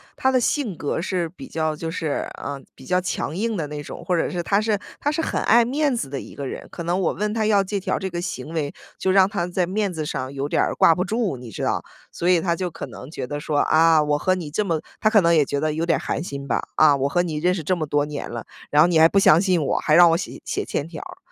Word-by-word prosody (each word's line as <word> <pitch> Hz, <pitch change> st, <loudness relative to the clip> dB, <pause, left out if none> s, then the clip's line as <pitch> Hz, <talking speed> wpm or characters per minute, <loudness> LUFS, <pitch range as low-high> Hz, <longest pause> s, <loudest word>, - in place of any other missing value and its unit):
他 265 Hz, -, +1 dB
的 255 Hz, -, +3 dB
性 240 Hz, -, -1 dB
格 145 Hz, -, -2 dB
是 180 Hz, -1 st, -1 dB
比 225 Hz, +11 st, -11 dB
较 155 Hz, -7 st, -1 dB
就 160 Hz, +2 st, -5 dB
是， 160 Hz, -3 st, -2 dB
呃， 140 Hz, -1 st, -5 dB
比 130 Hz, -, -14 dB
较 180 Hz, +6 st, +1 dB
强 170 Hz, -3 st, -3 dB
硬 220 Hz, +3 st, -1 dB
的 160 Hz, -, -2 dB
那 150 Hz, 0 st, -6 dB
种， -, -, -9 dB
或 180 Hz, -, +1 dB
者 165 Hz, -, 0 dB
是 175 Hz, -1 st, -3 dB
他 200 Hz, +3 st, +2 dB
是 215 Hz, -1 st, +1 dB, 0.2 s
他 290 Hz, -, 0 dB
是 305 Hz, -, -3 dB
很 -, -, -1 dB
爱 235 Hz, +1 st, +5 dB
面 280 Hz, +2 st, +1 dB
子 185 Hz, -, -3 dB
的 135 Hz, 0 st, -4 dB
一 -, -, -12 dB
个 140 Hz, -, -5 dB
人。 -, -, -6 dB
可 170 Hz, -, -6 dB
能 175 Hz, +3 st, 0 dB
我 175 Hz, -, +1 dB
问 210 Hz, +1 st, -2 dB
他 220 Hz, -1 st, 0 dB
要 205 Hz, -2 st, +4 dB
借 200 Hz, +1 st, -3 dB
条 190 Hz, -, -1 dB
儿 -, -, -2 dB
这 190 Hz, -, -3 dB
个 175 Hz, -1 st, -4 dB
行 175 Hz, -3 st, -5 dB
为， 150 Hz, -3 st, -2 dB, 0.3 s
就 190 Hz, -, 0 dB
让 190 Hz, 0 st, +5 dB
他 195 Hz, -4 st, -2 dB
在 180 Hz, 0 st, 0 dB
面 200 Hz, +2 st, -1 dB
子 160 Hz, -3 st, -4 dB
上 130 Hz, -2 st, -4 dB
有 140 Hz, 0 st, -3 dB
点 -, -, +1 dB
儿 -, -, 0 dB
挂 165 Hz, -, +6 dB
不 180 Hz, -, -1 dB
住， 210 Hz, -, -1 dB
你 120 Hz, -2 st, -10 dB
知 -, -, -6 dB
道。 -, -, 0 dB, 0.3 s
所 175 Hz, -, -1 dB
以 180 Hz, -2 st, +5 dB
他 170 Hz, 0 st, 0 dB
就 180 Hz, 0 st, -3 dB
可 160 Hz, -, -7 dB
能 125 Hz, +1 st, -10 dB
觉 155 Hz, -, -5 dB
得 145 Hz, +3 st, -4 dB
说： 150 Hz, 0 st, -2 dB
“啊， 160 Hz, 0 st, +4 dB
我 150 Hz, 0 st, +1 dB
和 185 Hz, +4 st, +2 dB
你 165 Hz, -5 st, -6 dB
这 210 Hz, -, 0 dB
么 165 Hz, -5 st, -1 dB, 0.2 s
“他 215 Hz, -, +4 dB
可 215 Hz, -2 st, +5 dB
能 170 Hz, -1 st, +4 dB
也 150 Hz, -, +5 dB
觉 140 Hz, +1 st, -2 dB
得 155 Hz, +1 st, 0 dB
有 160 Hz, +2 st, -2 dB
点 170 Hz, -1 st, +2 dB
儿 -, -, -5 dB
寒 -, -, -3 dB
心 140 Hz, -5 st, -6 dB
吧，” 125 Hz, -, 0 dB
啊， 155 Hz, -2 st, +6 dB
我 135 Hz, +1 st, 0 dB
和 175 Hz, +4 st, +1 dB
你 160 Hz, -4 st, -3 dB
认 175 Hz, +4 st, +2 dB
识 175 Hz, -3 st, -4 dB
这 185 Hz, +5 st, +1 dB
么 155 Hz, -3 st, -3 dB
多 145 Hz, 0 st, +1 dB
年 150 Hz, -1 st, -6 dB
了， 120 Hz, -1 st, -6 dB, 0.2 s
然 145 Hz, -, +2 dB
后 -, -, +5 dB
你 165 Hz, -2 st, +3 dB
还 160 Hz, -, +7 dB
不 200 Hz, -, 0 dB
相 165 Hz, -3 st, +6 dB
信 185 Hz, -3 st, +2 dB
我， -, -, 0 dB
还 155 Hz, -, +2 dB
让 175 Hz, 0 st, +8 dB
我 165 Hz, -, +3 dB
写 170 Hz, -, -6 dB
写 -, -, -2 dB
欠 145 Hz, -, -3 dB
条 165 Hz, -, -8 dB
儿。 -, -, -10 dB
170 Hz, 325 characters per minute, -23 LUFS, 150-190 Hz, 0.3 s, 让